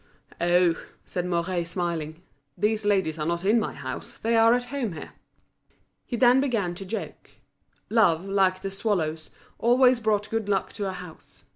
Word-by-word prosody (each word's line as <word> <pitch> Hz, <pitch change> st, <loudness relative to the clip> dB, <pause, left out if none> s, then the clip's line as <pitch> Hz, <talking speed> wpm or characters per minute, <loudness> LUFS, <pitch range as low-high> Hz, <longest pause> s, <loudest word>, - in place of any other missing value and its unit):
"Oh!" 175 Hz, -1 st, +3 dB, 0.2 s
said 180 Hz, 0 st, -3 dB
Mouret, 175 Hz, 0 st, -1 dB
smiling, 170 Hz, -2 st, -3 dB, 0.3 s
"these 215 Hz, 0 st, 0 dB
ladies 190 Hz, -6 st, +1 dB
are 150 Hz, -, -1 dB
not 170 Hz, +2 st, -2 dB
in 220 Hz, +4 st, +4 dB
my -, -, -3 dB
house, -, -, -7 dB
they 230 Hz, +1 st, 0 dB
are 225 Hz, +1 st, +6 dB
at 245 Hz, -, -1 dB
home 245 Hz, -9 st, -2 dB
here." 160 Hz, -, -8 dB, 1.0 s
He 240 Hz, -, -3 dB
then 250 Hz, +2 st, +5 dB
began 225 Hz, -10 st, 0 dB
to 195 Hz, +3 st, -8 dB
joke. 220 Hz, -, -6 dB, 0.6 s
Love, 190 Hz, -6 st, +3 dB
like 190 Hz, -1 st, +1 dB
the 195 Hz, -, -3 dB
swallows, 175 Hz, -6 st, -2 dB, 0.3 s
always 250 Hz, +1 st, +4 dB
brought 210 Hz, -2 st, 0 dB
good 225 Hz, -2 st, -2 dB
luck 195 Hz, -2 st, 0 dB
to 200 Hz, -3 st, -3 dB
a -, -, -4 dB
house. 180 Hz, -3 st, -12 dB
195 Hz, 165 wpm, -26 LUFS, 175-225 Hz, 1.0 s, are